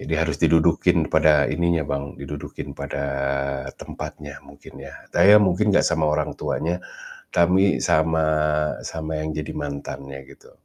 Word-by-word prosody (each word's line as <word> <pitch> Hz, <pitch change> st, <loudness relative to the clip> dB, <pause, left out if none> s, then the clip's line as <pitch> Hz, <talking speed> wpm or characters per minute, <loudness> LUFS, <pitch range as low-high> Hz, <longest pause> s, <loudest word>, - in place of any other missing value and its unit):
Jadi, -, -, -6 dB
harus -, -, 0 dB
didudukin 80 Hz, -1 st, +3 dB
pada 75 Hz, -2 st, +4 dB
ininya, 85 Hz, -1 st, +1 dB
Bang, 70 Hz, 0 st, -4 dB
didudukin 70 Hz, +1 st, -7 dB
pada 70 Hz, 0 st, -4 dB, 0.8 s
tempatnya, 75 Hz, -1 st, -8 dB
mungkin, 70 Hz, 0 st, -15 dB
ya. -, -, -10 dB, 0.2 s
Saya 105 Hz, +2 st, +7 dB
mungkin 100 Hz, +3 st, +2 dB
enggak -, -, +4 dB
sama 80 Hz, -2 st, 0 dB
orang -, -, -1 dB
tuanya, 85 Hz, +3 st, -2 dB, 0.5 s
tapi 95 Hz, +3 st, +3 dB
sama 80 Hz, -1 st, +2 dB, 0.6 s
sama 80 Hz, -1 st, -4 dB
yang 80 Hz, -, -3 dB
jadi 75 Hz, -, -4 dB
mantannya, 70 Hz, -1 st, -6 dB
gitu. -, -, -17 dB
80 Hz, 135 wpm, -23 LUFS, 70-85 Hz, 0.8 s, Saya